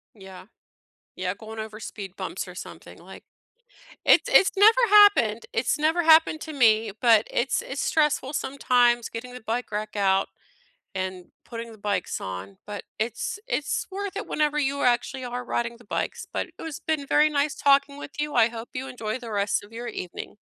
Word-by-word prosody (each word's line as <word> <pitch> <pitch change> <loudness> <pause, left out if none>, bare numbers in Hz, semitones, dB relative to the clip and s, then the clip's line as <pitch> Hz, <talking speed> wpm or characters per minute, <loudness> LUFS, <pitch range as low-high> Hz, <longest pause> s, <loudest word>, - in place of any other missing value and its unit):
Yeah, 190 -2 -12 0.7
yeah, 180 +1 -3
going 220 +1 -10
over 215 0 -7
speed 200 -4 -8
bumps - - -5
or - - -10
something, - - -10
like - - -13 0.8
it's - - +6
it's 385 - +6
never 440 +5 +6
happened 405 - +6
it's 260 - 0
never 320 +3 +2
happened 320 -1 +5
to 315 - -7
me, 220 -5 +3
but 225 -3 +5
it's 255 - 0
it's 275 +1 -5
stressful 300 -3 +1
sometimes 245 -4 +2
getting 250 +2 -8
the 250 - -9
bike 230 +2 -3
rack 210 0 -4
out, 195 -1 +2 0.7
and 185 -1 -4 0.2
putting 230 -1 -7
the 215 - -14
bikes 200 -3 -2
on, 95 +1 -7
but 205 -1 -6 0.2
it's 230 - -3
it's 295 - -2
worth 400 0 -5
it - - -4
whenever 300 -1 0
you 280 0 0
actually 250 +1 +1
are 245 0 -5
riding 235 0 -2
the 240 - -19
bikes, - - -3
but - - -2
it - - -23
has 320 -3 -6
been 305 -3 -2
very 305 +2 +4
nice 290 0 0
talking 280 0 +3
with 290 - -9
you, 295 0 -2
I 230 -1 +5
hope 230 0 -8
you 265 +1 -4
enjoy 230 -1 -4
the 235 -2 -9
rest 205 0 0
of 205 +2 -16
your 240 +1 -6
evening. 180 +3 -7
240 Hz, 185 wpm, -25 LUFS, 215-285 Hz, 0.8 s, it's